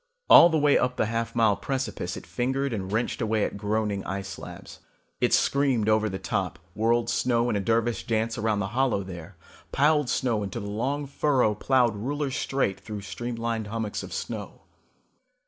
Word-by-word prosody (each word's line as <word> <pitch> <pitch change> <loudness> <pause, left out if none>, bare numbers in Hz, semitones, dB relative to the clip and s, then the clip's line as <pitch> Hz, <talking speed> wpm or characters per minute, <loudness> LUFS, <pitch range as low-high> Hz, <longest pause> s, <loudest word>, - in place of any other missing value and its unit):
All 170 - +10
the 160 - +1
way 145 -1 +4
up 125 0 0
the - - +2
half 115 +1 -3
mile 110 -3 +4
precipice 105 -8 -3
it - - -9
fingered 135 +2 -1
and 95 -3 -4
wrenched 115 +4 -1
away 110 -2 +1
at - - -5
groaning 105 0 -1
ice 95 0 -4
slabs. - - -9 0.4
It - - +2
screamed 135 -6 +2
over 110 0 +3
the 95 - -4
top, - - -2 0.2
whirled 115 +3 +1
snow 120 0 +1
in - - -1
a - - +1
dervish 115 +3 0
dance 115 0 0
around 110 -2 0
the 100 - -2
hollow 125 -6 +1
there, 90 0 -9 0.4
piled 150 -1 +3
snow 115 -5 0
into 100 +3 -4
the 100 - -6
long 130 +8 -2
furrow 135 -5 +1
plowed 120 +1 +2
ruler 140 +6 -2
straight 130 -7 -1
through 105 -2 -7
streamlined 115 +1 -4
hummocks 110 -1 -3
of - - -9
snow. - - -6
115 Hz, 180 wpm, -26 LUFS, 105-130 Hz, 0.4 s, All